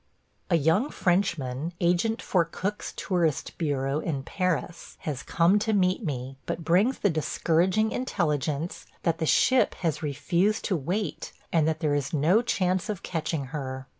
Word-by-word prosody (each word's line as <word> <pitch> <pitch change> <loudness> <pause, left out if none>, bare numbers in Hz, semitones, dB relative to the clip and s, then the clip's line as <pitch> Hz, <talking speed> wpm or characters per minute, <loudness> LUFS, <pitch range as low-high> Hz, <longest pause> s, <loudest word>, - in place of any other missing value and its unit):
A - - +4
young 165 - +2
Frenchman, 170 -5 0
agent 180 +6 +1
for 180 -3 +2
Cook's 195 +5 -4
tourist 170 -6 -1
bureau 140 -3 0
in 145 -5 -3
Paris, 180 0 -2
has 145 -4 -3
come 175 +5 +3
to 220 +1 0
meet 185 +1 +2
me, 135 -4 -4
but 165 - -3
brings 200 +10 +3
the 205 - +2
discouraging 175 +6 +1
intelligence 155 - -2 0.2
that 165 -1 +1
the 160 - 0
ship 260 - +4
has 165 -5 -2
refused 170 +8 0
to 195 - +1
wait 180 +8 -3 0.2
and 160 -2 +3
that 160 0 -1
there 150 -3 +1
is 145 0 -1
no 165 +10 +4
chance 185 -5 0
of 205 -4 -4
catching 160 -3 -2
her. 130 -3 -4
170 Hz, 155 wpm, -27 LUFS, 150-190 Hz, 0.2 s, A